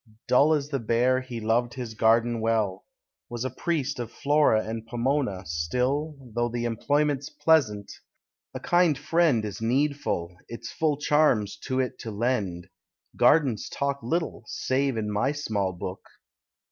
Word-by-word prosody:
] - - -50
Dull 145 +5 +5
as 145 -1 -3
the 140 -2 -1
Bear, 125 +3 +2
he 125 -2 -6
loved 115 +2 0
his 120 -4 -5
garden 115 +1 +3
well; 110 -4 0 0.4
Was 120 +1 -4
priest 150 -6 -1
of 120 -1 -5
Flora 145 -6 +2
and 110 0 -5
Pomona; 120 -5 -1
still, 125 - -1 0.2
Though 120 +1 0
the 120 0 -3
employment's 145 +4 0
pleasant, 115 -11 +2 0.6
a - - -3
kind 175 -4 +3
friend 150 -5 +2
Is 105 0 -6
needful, 120 - 0
its 115 0 -7
full 155 -3 0
charms 145 -9 +2
to 130 -1 0
it 130 -1 -2
to 115 - -6
lend: 105 -6 -2 0.5
Gardens 135 -9 +3
talk 140 0 -2
little, 160 +8 -2
save 135 -1 -1
in 105 -1 -2
my 120 +8 +1
small 105 -10 -1
book. 90 +1 -6
120 Hz, 145 wpm, -26 LUFS, 110-145 Hz, 0.6 s, Dull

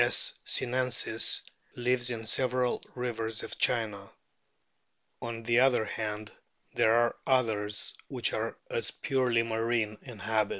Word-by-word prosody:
S. - - +4
sinensis 125 -3 +1 0.3
lives 125 0 +1
in 115 -2 -4
several 125 +1 +1
rivers 115 -3 -3
of - - -7
China. 105 -5 +1 1.1
On 115 -1 -5
the 120 +1 +4
other 125 -4 +4
hand, 105 0 -4 0.4
there 110 - +4
are 120 0 +3
others 110 -5 +1
which - - 0
are - - -2
as - - 0
purely 125 -4 +1
marine 115 -1 0
in 120 -4 -10
habit. 110 0 +1
115 Hz, 125 wpm, -30 LUFS, 110-125 Hz, 1.1 s, S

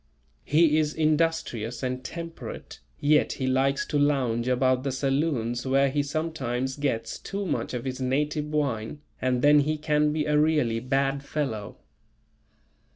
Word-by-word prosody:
He 155 +1 +4
is 150 -1 0
industrious 155 -7 0
and 130 0 -2
temperate, 165 +3 -7 0.2
yet 150 +1 +3
he 130 - -3
likes 135 +1 +1
to 145 - -1
lounge 130 -5 +1
about 130 0 +2
the 135 0 -2
saloons 135 -3 0
where 135 +1 +3
he 145 +1 +1
sometimes 140 -4 -2
gets 115 -6 -2
too 200 0 -4
much 150 -6 -2
of 120 - -4
his 130 0 -4
native 150 +4 0
wine 145 -4 -2 0.2
and 125 -1 0
then 145 0 +7
he 155 +2 0
can 150 0 +1
be 150 0 -1
a 150 0 +2
really 150 -7 +2
bad 135 +2 0
fellow. 115 -10 -4
140 Hz, 150 wpm, -26 LUFS, 130-150 Hz, 0.2 s, then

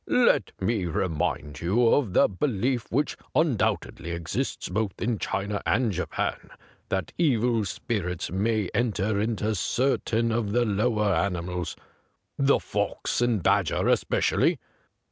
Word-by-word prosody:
Let 240 - +3
me 100 -1 0
remind 75 -3 -2
you 110 +8 +3
of 120 -9 +2
the - - +5
belief 120 +3 -1
which 145 +5 0 0.2
undoubtedly 120 - 0
exists 85 -1 -3
both 100 +1 -2
in 115 -2 -1
China 100 +1 -2
and 125 -3 +1
Japan, 90 -1 -3 0.4
that 95 -1 -2
evil 120 -8 +2
spirits 90 -4 -3
may 105 +1 0
enter 105 -2 0
into 110 0 0
certain 115 +2 0
of 110 -3 -1
the 120 0 +3
lower 105 -1 +1
animals, 90 -1 -2 0.6
the 140 0 +3
fox - - -2
and 115 -6 +1
badger - - +2
especi - - +2
ally. - - +3
105 Hz, 125 wpm, -26 LUFS, 95-120 Hz, 0.6 s, the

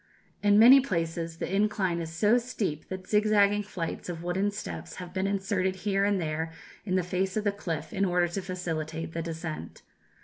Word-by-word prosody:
In 205 0 +5
many 245 +5 +9
places 165 -7 -2
the 185 - -2
incline 200 -4 +1
is 165 -1 -5
so 210 +9 +3
steep 205 -10 -3
that 185 0 -6
zigzag 210 -1 +3
flights 180 -4 -5
of 170 -1 -5
wooden 185 +3 0
steps 205 +1 -6
have 180 -1 -8
been 190 0 0
inserted 190 -1 0
here 195 -1 +2
and 200 -1 +2
there 160 0 -2 0.4
in 185 - +1
the 185 - +2
face 185 +3 -1
of 215 - 0
the 205 - +2
cliff 165 -6 -5
in 195 - 0
order 180 -2 +2
to 175 +3 -4
facilitate 165 -3 -4
the 165 - -2
descent. 160 -1 -6
185 Hz, 190 wpm, -28 LUFS, 165-205 Hz, 0.4 s, many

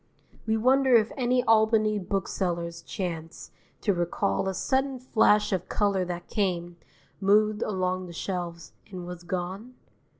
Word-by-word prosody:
We 220 0 +2
wonder 260 +2 +4
if 220 -1 +4
any 250 -1 +1
Albany 220 -1 +3
booksellers 175 -3 -2
chance 165 -3 -6 0.3
to 205 - +2
recall 175 - 0
a - - -2
sudden 265 +5 0
flash 220 -4 +3
of 185 -1 -2
colour 200 -3 +1
that 175 -1 -5
came, 175 -4 -1 0.4
moved 210 +2 +3
along 185 -2 -1
the - - -9
shelves, 170 -1 -5 0.2
and 180 -3 -7
was 180 -1 -7
gone? 185 +7 -5
195 Hz, 135 wpm, -27 LUFS, 175-220 Hz, 0.4 s, wonder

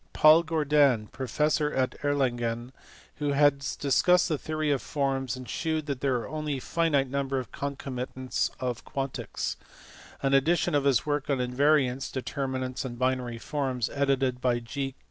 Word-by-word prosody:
Paid 155 +2 +6
Gordan, 145 -8 +3
professor 150 +4 0
at 130 -1 0
Erlangen, 120 -4 0 0.5
who 145 -1 0
has 140 -1 +2
discussed 180 +6 +3
the 155 - +1
theory 155 -1 -1
of 140 - +1
forms, 135 -4 -1
and 130 -1 -9
shewn 160 -2 -2
that 140 -4 -4
there 135 -2 +1
are 120 - -3
only 155 -2 -3
a - - -5
finite 150 -2 +1
number 135 0 -1
of 130 -2 -4
concomitants 130 -2 -3
of 125 -2 -3
quantics: 135 -1 -4 0.7
an 135 0 +2
edition 160 +5 +3
of 145 -1 +2
his 135 -4 +3
work 145 -1 -1
on 140 - +2
invariants 130 +1 +2
(determinants 130 -1 -3
and 120 -3 -6
binary 125 -2 -1
forms) 130 -1 -2
edited 135 -3 +1
by 125 -1 +2
G. 135 +3 -4
135 Hz, 155 wpm, -28 LUFS, 130-145 Hz, 0.7 s, Paid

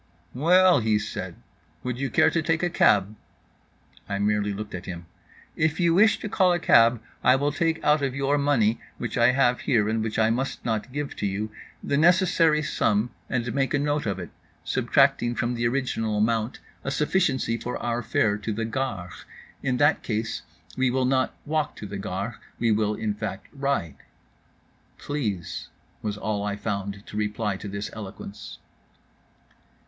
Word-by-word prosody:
"Well," 175 +4 +5
he 110 -2 +2
said, 95 -4 -5 0.5
"would 125 0 -3
you 135 0 -1
care 160 - +4
to 170 - +1
take 160 +1 0
a 175 - +1
cab?" 105 - +3 0.9
I 100 - -1
merely 105 0 +1
looked 105 +1 -6
at 90 -1 -6
him. 85 -1 -6 0.5
"If 160 +1 +1
you 170 -2 +3
wish 215 +5 +5
to - - -3
call 185 -3 +3
a - - +2
cab, 115 -5 +5 0.2
I 125 - +6
will 145 +2 +1
take 165 +1 0
out 150 0 +4
of 135 -2 -1
your 140 +1 +1
money, 120 -6 +2 0.2
which 120 -3 -4
I 120 0 +5
have 125 -2 +3
here 110 -6 +2
and 110 +1 0
which 110 0 -3
I 110 0 +3
must 130 +3 -2
not 110 +1 -2
give 145 +1 -4
to 100 - -1
you, 105 +2 -3 0.3
the 140 - 0
necessary 170 -2 +4
sum, 110 -4 +1 0.2
and 120 -2 -1
make 135 +1 +1
a - - +3
note 145 -2 0
of 100 -2 -1
it, 90 - -7 0.3
subtracting 120 0 +2
from 120 +1 -1
the 120 -1 0
original 115 -4 -1
amount 110 +2 0 0.3
a - - -2
sufficiency 145 -5 +1
for 125 +1 -4
our 120 0 -2
fare 105 -3 +1
to 110 +2 -3
the 115 +2 -2
Gare. 110 -7 -3 0.5
In 130 -2 0
that 145 +2 +3
case 110 -1 -2 0.3
we 130 -1 +2
will 130 +1 +1
not 130 0 +1
walk 155 0 -1
to - - -8
the 100 0 -6
Gare, 100 +4 -4 0.2
we 115 -1 +2
will 105 0 +1
in 105 -1 -2
fact 105 -1 -6
ride." 135 - -1 1.0
"Please," 110 - -3 0.3
was 105 -1 -3
all 105 -1 -2
I 100 0 -2
found 100 -1 -4
to 105 - -8
reply 105 -1 -1
to 105 - -8
this 100 +1 -5
eloquence. 100 -1 -8
115 Hz, 175 wpm, -25 LUFS, 105-140 Hz, 1.0 s, I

